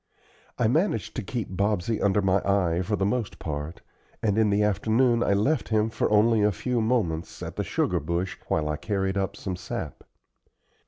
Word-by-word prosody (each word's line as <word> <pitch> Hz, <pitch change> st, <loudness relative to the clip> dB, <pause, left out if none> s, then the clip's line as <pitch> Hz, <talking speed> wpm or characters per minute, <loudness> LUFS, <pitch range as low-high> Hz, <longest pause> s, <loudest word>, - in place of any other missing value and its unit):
I 120 Hz, -, +2 dB
managed 130 Hz, -, 0 dB
to -, -, 0 dB
keep 105 Hz, -2 st, -4 dB
Bobsey 105 Hz, +2 st, 0 dB
under 100 Hz, 0 st, +2 dB
my 95 Hz, 0 st, +3 dB
eye 90 Hz, -3 st, +1 dB
for 105 Hz, +3 st, -1 dB
the 95 Hz, -, 0 dB
most 115 Hz, +1 st, -1 dB
part, 75 Hz, +1 st, -5 dB, 0.4 s
and 105 Hz, -3 st, +2 dB
in 110 Hz, -1 st, +3 dB
the 100 Hz, +1 st, +2 dB
afternoon 110 Hz, +4 st, +2 dB
I 100 Hz, -, +2 dB
left 125 Hz, +8 st, +1 dB
him 110 Hz, 0 st, +1 dB
for -, -, 0 dB
only 110 Hz, +1 st, +4 dB
a 105 Hz, 0 st, +4 dB
few 120 Hz, +6 st, -1 dB
moments 100 Hz, -9 st, -1 dB
at -, -, -6 dB
the -, -, -1 dB
sugar 90 Hz, -, 0 dB
bush 85 Hz, +5 st, -2 dB
while 75 Hz, -1 st, 0 dB
I 75 Hz, 0 st, -1 dB
carried 95 Hz, +3 st, -1 dB
up 100 Hz, 0 st, -1 dB
some 95 Hz, -2 st, -4 dB
sap. 90 Hz, -, -6 dB
100 Hz, 190 wpm, -26 LUFS, 90-110 Hz, 0.4 s, only